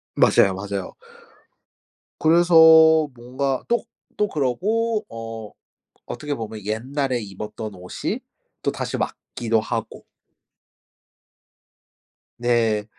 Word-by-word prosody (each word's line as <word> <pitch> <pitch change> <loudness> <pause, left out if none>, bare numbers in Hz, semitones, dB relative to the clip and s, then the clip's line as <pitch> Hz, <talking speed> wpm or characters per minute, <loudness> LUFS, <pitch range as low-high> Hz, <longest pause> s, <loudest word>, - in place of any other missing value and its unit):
맞아요. 95 - +4
맞아요. 100 0 -5 1.3
그래서 160 -1 +6
뭔가 130 +2 -3
또 235 -1 +1 0.4
또 210 - +3
그러고 210 - 0
어 115 -2 -7 0.6
어떻게 150 -1 -4
보면 110 -5 -7
옛날에 125 +4 -2
입었던 105 +1 -7
옷이 90 0 -4 0.4
또다시 - - -2
맞기도 115 -1 -2
하고. 115 -1 -5 2.3
네. 115 -3 +1
120 Hz, 180 characters per minute, -22 LUFS, 110-160 Hz, 2.3 s, 그래서